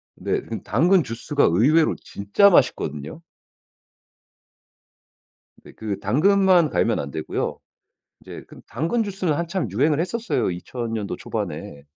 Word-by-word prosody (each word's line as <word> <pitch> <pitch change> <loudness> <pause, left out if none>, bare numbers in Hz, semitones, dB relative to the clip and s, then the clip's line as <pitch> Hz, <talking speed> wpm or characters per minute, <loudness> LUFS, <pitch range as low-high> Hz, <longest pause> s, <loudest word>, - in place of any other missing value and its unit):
네. - - -2
근데 - - -7
당근 170 - +3
주스가 125 +4 -1
의외로 145 - +3
진짜 100 - +3
맛있거든요. 75 - 0 2.4
네. - - -14
그 105 -3 -5
당근만 180 - +3
갈면 115 -4 +1
안 70 -1 -5
되고요. 80 - -3 0.6
이제 - - -10
그 - - -14
당근 165 - -1
주스는 190 -5 -2
한참 170 - -2
유행을 145 +8 +1
했었어요 185 - -1
2000 115 +6 -5
년도 105 -3 -3
초반에. 70 0 -6
145 Hz, 255 characters per minute, -23 LUFS, -, 2.4 s, 당근